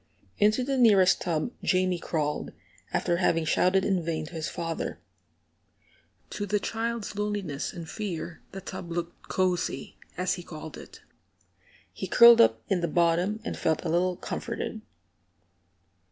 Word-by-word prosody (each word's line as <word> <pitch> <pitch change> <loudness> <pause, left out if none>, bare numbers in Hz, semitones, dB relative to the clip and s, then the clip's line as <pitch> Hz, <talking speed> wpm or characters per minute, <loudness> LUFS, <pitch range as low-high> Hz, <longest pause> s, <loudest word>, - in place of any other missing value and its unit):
Into 215 +4 +4
the 270 0 -1
nearest 200 -6 +5
tub 165 +5 -1
Jamie 185 -1 +1
crawled, 150 -3 -2 0.4
after 175 -1 +1
having 165 -2 +2
shouted 185 +4 +3
in 190 -4 +1
vain 160 -1 -2
to 160 - -12
his 160 -2 -3
father. 165 -1 -4 1.3
To 205 - -4
the 210 +1 +1
child's 225 0 -3
loneliness 205 -8 -2
and 170 -2 -8
fear 170 -4 -5
the 195 - -7
tub 185 -2 -7
looked 170 0 -5
"cosey," 180 -7 -1 0.2
as 180 0 +1
he 180 - -5
called 155 -1 -9
it. - - -12 0.9
He - - -5
curled 235 -1 +8
up 115 0 +3
in 185 -2 +1
the 170 - +1
bottom, 175 +6 +1
and - - -3
felt 160 0 0
a - - 0
little 180 +2 +1
comforted. - - -5
180 Hz, 145 wpm, -27 LUFS, 165-200 Hz, 1.3 s, curled